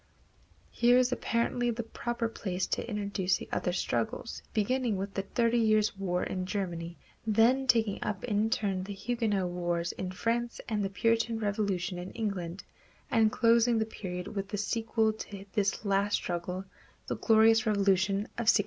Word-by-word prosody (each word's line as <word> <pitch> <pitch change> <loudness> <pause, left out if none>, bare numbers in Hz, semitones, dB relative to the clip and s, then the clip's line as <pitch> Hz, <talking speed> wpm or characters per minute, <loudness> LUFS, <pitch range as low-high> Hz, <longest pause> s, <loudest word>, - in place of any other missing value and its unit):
Here 245 +1 +4
is 255 -1 +3
apparently 240 0 0
the 235 0 -2
proper 235 +1 -3
place 190 -4 -3
to - - -3
introduce 200 -4 0
the - - -9
other 180 - 0
struggles, 175 - -2
beginning 235 0 0
with 195 +1 -4
the 195 - -1
Thirty 230 +4 +1
Years' 215 -2 +3
War 180 -2 -1
in 185 -1 -3
Germany, 170 -4 -3 0.3
then 235 +5 +4
taking 225 -5 +2
up 200 -3 -3
in 215 -1 +1
turn 195 -4 0
the 200 0 -6
Huguenot 210 -4 0
wars 175 -1 -1
in 185 - -5
France 235 +4 -1
and 215 -3 0
the 195 - -1
Puritan 230 +2 +1
Revolution 200 -4 -1
in 180 +1 -6
England, 195 -5 -3 0.5
and 220 -2 +4
closing 235 0 +4
the 220 - +1
period 180 -4 -6
with 195 -1 -4
the 205 - -3
sequel 220 +1 +1
to 200 -2 -8
this 205 0 0
last 200 +1 +2
struggle, 180 +2 -3 0.4
The - - -2
Glorious 225 0 +4
Revolution 195 -2 +3 0.2
of 230 -2 +3
1688. - - +6
210 Hz, 165 wpm, -30 LUFS, 190-230 Hz, 0.5 s, 1688